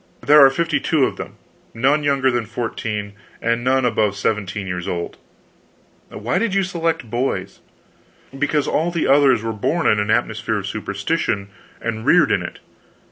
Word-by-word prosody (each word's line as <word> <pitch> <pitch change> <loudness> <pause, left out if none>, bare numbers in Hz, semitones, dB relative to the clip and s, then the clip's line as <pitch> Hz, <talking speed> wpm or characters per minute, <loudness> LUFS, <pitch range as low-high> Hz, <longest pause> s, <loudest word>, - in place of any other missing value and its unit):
There 150 0 +7
are 135 - +8
fifty 165 +5 0
two 155 -6 +2
of - - -4
them; - - -7 0.4
none 135 +6 +2
younger 140 -2 +2
than 120 -3 -2
fourteen, 110 -3 -4 0.3
and 115 +1 0
none 130 0 +2
above 110 -4 +1
seventeen 100 -1 -2
years 90 -2 -4
old." 85 -1 -4 0.9
"Why 115 +4 -2
did 220 -4 -1
you 195 - +3
select 165 -6 -2
boys?" 100 -6 -2 0.8
"Because 145 +1 0
all 165 +3 +1
the 170 -2 -1
others 135 -4 +4
were 115 0 -2
born 160 +11 -1
in 105 - +4
an 105 +1 -1
atmosphere 115 +2 0
of - - -4
superstition 100 -1 -2 0.3
and 110 -1 -4
reared - - +4
in - - +2
it. - - -7
120 Hz, 165 wpm, -20 LUFS, 105-145 Hz, 0.9 s, are